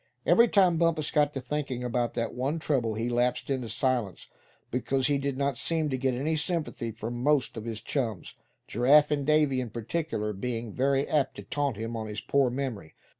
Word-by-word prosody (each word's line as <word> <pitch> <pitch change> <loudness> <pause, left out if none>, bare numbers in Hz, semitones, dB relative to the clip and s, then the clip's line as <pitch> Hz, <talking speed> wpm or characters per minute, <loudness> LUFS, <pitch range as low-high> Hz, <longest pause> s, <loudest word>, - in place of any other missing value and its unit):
Every 235 +1 +6
time 185 -6 +4
Bumpus 165 -2 +1
got 150 -1 +3
to - - -1
thinking 130 -1 -3
about 120 -1 -1
that 115 -1 -2
one 135 +6 -1
trouble 130 -8 0
he 115 +2 -2
lapsed 120 +3 0
into 130 -4 -2
silence, 115 -5 -1 0.5
because 130 +2 0
he 140 +1 +2
did 140 -1 -2
not 140 -3 -1
seem 160 -3 0
to 130 - 0
get 130 -1 +1
any 150 +6 0
sympathy 155 -7 -2
from 115 +2 -5
most 145 -1 +2
of 110 -1 -6
his 110 -2 -4
chums; 115 - -3 0.3
Giraffe 145 +6 +5
and 145 -2 0
Davy 150 -4 +3
in 125 - -5
particular 115 -1 -3
being 115 +1 -4
very 135 +1 +1
apt 140 -3 +1
to - - -8
taunt 140 -6 -2
him 115 +2 -4
on 110 -1 -4
his 105 0 -4
poor 140 -2 +2
memory. 120 - -4
130 Hz, 195 wpm, -28 LUFS, 115-145 Hz, 0.5 s, Every